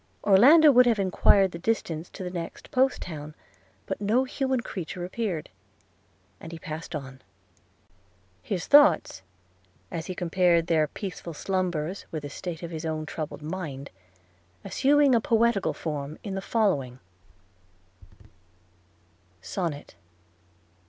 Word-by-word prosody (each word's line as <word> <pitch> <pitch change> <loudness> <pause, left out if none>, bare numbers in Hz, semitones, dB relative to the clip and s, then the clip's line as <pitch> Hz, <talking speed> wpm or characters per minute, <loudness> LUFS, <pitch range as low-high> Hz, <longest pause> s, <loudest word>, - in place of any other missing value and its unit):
Orlando 285 +11 +7
would 250 -1 +6
have 230 -2 +3
enquired 195 0 +3
the 170 - -7
distance 170 -5 -2
to - - -8
the 180 - -5
next 170 -2 -7
post 265 +1 +2
town, 155 -3 -8 0.5
but - - -5
no 220 +6 +2
human 265 -1 -1
creature 180 -4 -6
appeared 185 -4 -4 0.4
– - - -38
and 165 - -9
he 165 - -7
passed 160 0 -7
on; 135 -2 -8 1.2
his 175 - -3
thoughts 290 - +5 0.7
(as 165 -2 -5
he 185 - -5
compared 175 -1 +2
their 160 -2 +2
peaceful 180 -2 -7
slumbers 185 -1 -2
with 155 -2 -5
the 145 - -6
state 170 +1 -6
of 170 - -6
his 160 -1 -5
own 155 -1 -3
troubled 155 -1 -6
mind) 155 -5 -6 0.7
assuming 285 0 +3
a 235 - +4
poetical 230 -3 +2
form, 150 -1 -5
in 200 - -5
the 195 - -3
following 185 - 0 2.4
SONNET. 165 - -5
180 Hz, 130 wpm, -26 LUFS, 155-215 Hz, 2.4 s, Orlando